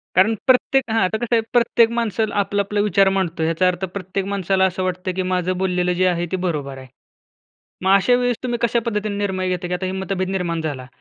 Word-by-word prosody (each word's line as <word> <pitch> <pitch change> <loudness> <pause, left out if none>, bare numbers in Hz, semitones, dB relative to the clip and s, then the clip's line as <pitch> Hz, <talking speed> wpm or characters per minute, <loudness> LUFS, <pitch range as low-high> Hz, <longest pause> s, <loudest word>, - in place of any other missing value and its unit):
कारण 190 +5 +5
प्रत्येक 260 +1 +3
हां. 225 - +2
आता 185 +4 0
कसं 235 +1 0
आहे 225 - +3
प्रत्येक 235 -1 +4
माणसं 225 -2 -1
आपला 200 0 -1
आपला 205 +1 -2
विचार 195 -1 +3
मांडतो. 175 -4 -1
याचा 165 +3 +2
अर्थ 180 +1 -1
प्रत्येक 190 0 -4
माणसाला 195 -1 +1
असं 185 0 -1
वाटतं, 185 0 -2
की 185 - 0
माझं 180 0 0
बोललेलं 180 -1 0
जे 185 +1 +1
आहे 175 -1 0
ते 190 - +1
बरोबर 145 -6 -3
आहे. 130 0 -11 1.0
मग 190 - +3
अशा 200 +5 +4
वेळेस 245 -2 0
तुम्ही 240 -2 -2
कशा 235 0 +2
पद्धतीने 210 -2 -2
निर्णय 190 -2 -1
घेता? 180 -1 -2
की 180 - -5
आता 185 +1 -3
ही 185 - -3
मतभेद 190 -1 -2
निर्माण 175 -4 -2
झाला, 140 -5 -4
190 Hz, 220 wpm, -21 LUFS, 180-210 Hz, 1.0 s, कारण